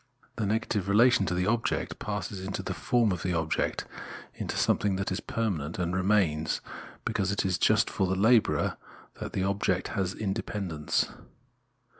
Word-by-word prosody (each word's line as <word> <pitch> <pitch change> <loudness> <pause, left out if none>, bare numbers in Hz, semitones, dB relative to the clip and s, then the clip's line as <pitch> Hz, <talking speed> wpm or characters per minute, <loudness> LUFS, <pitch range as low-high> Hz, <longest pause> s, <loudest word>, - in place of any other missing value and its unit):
The 110 -3 0
negative 105 -2 0
relation 105 -1 +5
to 90 - 0
the 90 +1 +1
object 115 +3 0
passes 100 -2 -4
into 95 +1 -4
the - - -3
form 120 -4 +2
of 90 -3 -2
the 90 -2 -1
object, 80 -1 -1 0.5
into - - -4
something 100 -2 +2
that 95 0 -2
is 95 - -1
per 115 0 -2
manent 80 -5 -3
and 90 0 -1
remains; 90 -5 +2 0.5
because 95 -1 0
it 100 - 0
is 95 -2 +1
just - - +4
for 95 - 0
the 95 - 0
labourer 110 +4 +3 0.4
that - - -5
the 95 - 0
object 95 -1 0
has 95 -1 -1
independence. 95 -6 -1
95 Hz, 165 wpm, -29 LUFS, 90-105 Hz, 0.5 s, relation